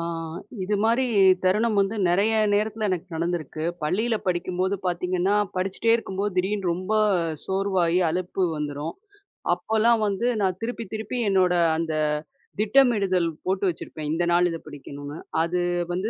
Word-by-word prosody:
அ -, -, -3 dB, 0.6 s
இதுமாரி 220 Hz, +5 st, +2 dB, 0.4 s
தருணம் 210 Hz, +3 st, +2 dB
வந்து 200 Hz, +3 st, 0 dB
நெறைய 200 Hz, +6 st, +3 dB, 0.2 s
நேரத்துல 215 Hz, +1 st, 0 dB
எனக்கு 185 Hz, 0 st, -2 dB
நடந்திருக்கு. 165 Hz, -2 st, -3 dB, 0.2 s
பள்ளியில 215 Hz, +10 st, +1 dB
படிக்கும்போது 185 Hz, +2 st, 0 dB
பார்த்தீங்கன்னா, 180 Hz, +2 st, 0 dB, 0.2 s
படிச்சிட்டே 190 Hz, +5 st, +1 dB
இருக்கும்போது 200 Hz, -3 st, -3 dB
திடீர்னு 190 Hz, 0 st, 0 dB
ரொம்ப 185 Hz, +4 st, -4 dB, 0.5 s
சோர்வாயி, 190 Hz, -3 st, +1 dB
அழுப்பு 180 Hz, +2 st, -2 dB
வந்துரும். 150 Hz, +1 st, -4 dB, 0.6 s
அப்பல்லாம் 220 Hz, +6 st, +2 dB
வந்து 200 Hz, +3 st, -1 dB, 0.2 s
நான் 185 Hz, -2 st, +1 dB
திருப்பி 230 Hz, 0 st, -3 dB
திருப்பி 220 Hz, +3 st, -4 dB
என்னோட 185 Hz, -2 st, +3 dB, 0.2 s
அந்த 160 Hz, -1 st, -2 dB, 0.7 s
திட்டமிடுதல் 210 Hz, -6 st, +3 dB, 0.2 s
போட்டு 190 Hz, +1 st, -1 dB
வச்சிருப்பேன். 155 Hz, -2 st, -6 dB
இந்த 170 Hz, +2 st, 0 dB
நாளு 175 Hz, +1 st, +4 dB
இத 165 Hz, -, -3 dB
படிக்கணும்னு, 145 Hz, 0 st, -8 dB, 0.3 s
அது 175 Hz, +1 st, -1 dB, 0.3 s
வந்து 190 Hz, +5 st, -1 dB
185 Hz, 125 wpm, -25 LUFS, 175-210 Hz, 0.7 s, நாளு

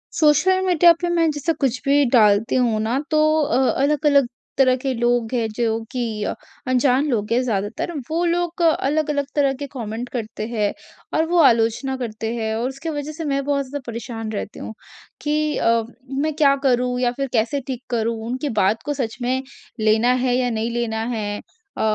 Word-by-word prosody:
Social 315 Hz, +5 st, +4 dB
media 350 Hz, -2 st, +6 dB
पे 350 Hz, -, 0 dB
मैं 335 Hz, -2 st, +2 dB
जैसे 295 Hz, +3 st, -1 dB
कुछ 265 Hz, -5 st, -1 dB
भी 285 Hz, +1 st, +4 dB
डालती 210 Hz, -2 st, +4 dB
हूँ 240 Hz, -4 st, +2 dB
ना। 230 Hz, +5 st, 0 dB
तो 305 Hz, -, +3 dB, 0.2 s
अ, 260 Hz, -1 st, +2 dB
अलग-अलग 285 Hz, -2 st, +3 dB, 0.3 s
तरह 255 Hz, -1 st, +5 dB
के 265 Hz, +1 st, -2 dB
लोग 240 Hz, -1 st, 0 dB
हैं 235 Hz, -3 st, +1 dB
जो 225 Hz, -2 st, +1 dB
कि 250 Hz, -3 st, -2 dB, 0.6 s
अनजान 255 Hz, +2 st, +3 dB
लोग 215 Hz, -5 st, -1 dB
हैं 245 Hz, -, +3 dB
ज़्यादातर। 205 Hz, -, -2 dB, 0.2 s
वो 330 Hz, +2 st, 0 dB
लोग 345 Hz, 0 st, -1 dB
अलग-अलग 300 Hz, -2 st, +1 dB
तरह 280 Hz, -2 st, +3 dB
के 285 Hz, -, -3 dB
कमेंट 235 Hz, -1 st, -5 dB
करते 220 Hz, -3 st, -5 dB
हैं 215 Hz, -3 st, 0 dB, 0.5 s
और 320 Hz, -, +3 dB
वो 350 Hz, 0 st, +3 dB
आलोचना 230 Hz, +2 st, +2 dB
करते 225 Hz, -2 st, -4 dB
हैं। 220 Hz, -1 st, -2 dB
और 235 Hz, +3 st, -1 dB
उसकी 275 Hz, +5 st, -6 dB
वजह 290 Hz, +2 st, -5 dB
से 320 Hz, +1 st, -6 dB
मैं 275 Hz, 0 st, 0 dB
बहुत 280 Hz, -1 st, 0 dB
ज़्यादा 285 Hz, 0 st, -5 dB
परेशान 225 Hz, -1 st, -5 dB
रहती 205 Hz, -1 st, -5 dB
हूँ। -, -, -7 dB, 0.5 s
कि 300 Hz, 0 st, 0 dB
अ, 230 Hz, 0 st, +2 dB, 0.3 s
मैं 285 Hz, +3 st, -1 dB
क्या 285 Hz, -3 st, +4 dB
करूँ? 250 Hz, 0 st, +1 dB
या 245 Hz, -1 st, +2 dB
फिर 275 Hz, 0 st, -1 dB
कैसे 235 Hz, +5 st, +1 dB
ठीक 260 Hz, -2 st, -5 dB
करूँ? 230 Hz, -1 st, 0 dB
उनकी 260 Hz, +4 st, -2 dB
बात 205 Hz, +4 st, +1 dB
को 295 Hz, -, -1 dB
सच 225 Hz, -2 st, -4 dB
में 255 Hz, +2 st, 0 dB, 0.5 s
लेना 220 Hz, +3 st, +4 dB
है 245 Hz, -1 st, +2 dB
या 250 Hz, -1 st, +1 dB
नहीं 225 Hz, 0 st, -2 dB
लेना 230 Hz, -2 st, -2 dB
है? 205 Hz, -1 st, -3 dB, 0.4 s
अ, -, -, -2 dB
255 Hz, 185 wpm, -21 LUFS, 230-290 Hz, 0.6 s, media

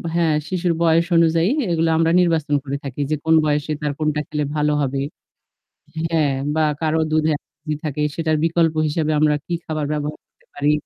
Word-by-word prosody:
হ্যাঁ, 165 Hz, -3 st, +2 dB
শিশুর 175 Hz, -1 st, 0 dB
বয়স 165 Hz, 0 st, +4 dB
অনুযায়ী 165 Hz, +2 st, +3 dB, 0.2 s
এগুলো 165 Hz, 0 st, +1 dB
আমরা 165 Hz, 0 st, +3 dB
নির্বাচন 160 Hz, -4 st, +1 dB
করে 140 Hz, 0 st, -3 dB
থাকি 140 Hz, 0 st, -5 dB
যে 155 Hz, -, +1 dB
কোন 160 Hz, 0 st, +4 dB
বয়সে 150 Hz, 0 st, 0 dB
তার 150 Hz, -1 st, -1 dB
কোনটা 150 Hz, -1 st, 0 dB
খেলে 150 Hz, -1 st, -2 dB
ভালো 150 Hz, 0 st, +1 dB
হবে। 135 Hz, 0 st, -1 dB, 1.1 s
হ্যাঁ। 155 Hz, -4 st, +1 dB, 0.2 s
বা 160 Hz, -, +2 dB, 0.2 s
কারো 160 Hz, 0 st, +1 dB
দুধে 155 Hz, 0 st, +2 dB
অ্যালার্জি 150 Hz, +1 st, -7 dB
থাকে, 150 Hz, 0 st, -2 dB
সেটার 160 Hz, -2 st, 0 dB
বিকল্প 165 Hz, -1 st, +2 dB
হিসেবে 155 Hz, +1 st, 0 dB
আমরা 150 Hz, -1 st, +3 dB
কি 175 Hz, -, -4 dB
খাবার 155 Hz, -2 st, -2 dB
ব্যবহার 150 Hz, 0 st, -3 dB
করতে -, -, -35 dB
পারি। 145 Hz, +1 st, +2 dB
155 Hz, 175 wpm, -21 LUFS, 150-165 Hz, 1.1 s, বয়স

